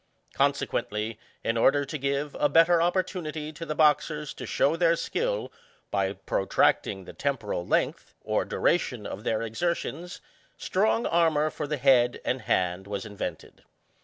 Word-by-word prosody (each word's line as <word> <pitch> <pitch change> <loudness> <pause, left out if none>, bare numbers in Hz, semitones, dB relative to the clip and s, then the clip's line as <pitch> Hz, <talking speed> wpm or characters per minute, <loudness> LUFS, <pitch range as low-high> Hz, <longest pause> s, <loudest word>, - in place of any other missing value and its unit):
Consequently, 105 +1 -1 0.2
in 115 +1 0
order 140 +5 +4
to 155 +3 -4
give 140 +1 -2
a 145 - +3
better 165 +1 +5
opportunity 170 -4 -1
to 165 +2 -8
the 155 - -2
boxers 150 -1 +2
to - - -8
show 145 +4 +2
their 170 0 +3
skill, - - -2 0.4
by 100 -1 0
protracting 95 -1 0
the - - -10
temporal 115 -10 -2
length, - - -1
or - - 0
duration 125 - 0
of 100 - -6
their 110 0 0
exertions, 170 +7 -3 0.4
strong 220 +4 +1
armour 155 -2 +2
for 150 - -4
the 150 0 -2
head 125 -2 +4
and 130 0 -1
hand 90 +1 0
was 100 -1 -4
invented. 105 -2 -6
145 Hz, 145 wpm, -27 LUFS, 115-165 Hz, 0.4 s, better